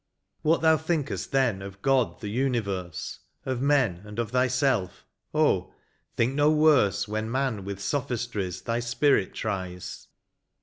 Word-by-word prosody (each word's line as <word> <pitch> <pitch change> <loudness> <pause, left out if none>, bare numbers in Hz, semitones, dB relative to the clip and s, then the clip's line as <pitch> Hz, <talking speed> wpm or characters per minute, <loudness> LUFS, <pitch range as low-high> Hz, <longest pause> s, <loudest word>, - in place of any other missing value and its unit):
What 160 +2 +2
thou 160 -1 +5
think'st 160 -2 -2
then, 125 -8 +2
of 95 0 -9
God, 135 -3 +2
the 105 - -4
universe. 100 - -2 0.3
Of 130 -2 -2
men 130 -11 +2
and 105 0 -10
of 115 -2 -2
thyself, 125 -6 +1 0.3
oh, - - +1 0.4
think 120 +3 +1
no 145 +1 +4
worse 150 -11 +4
When 110 +1 -2
man 130 -5 -1
with 100 -1 -5
sophistries 120 - -2
thy 115 0 -1
spirit 120 -2 +1
tries. 90 -2 -5
120 Hz, 135 wpm, -27 LUFS, 100-135 Hz, 0.4 s, thou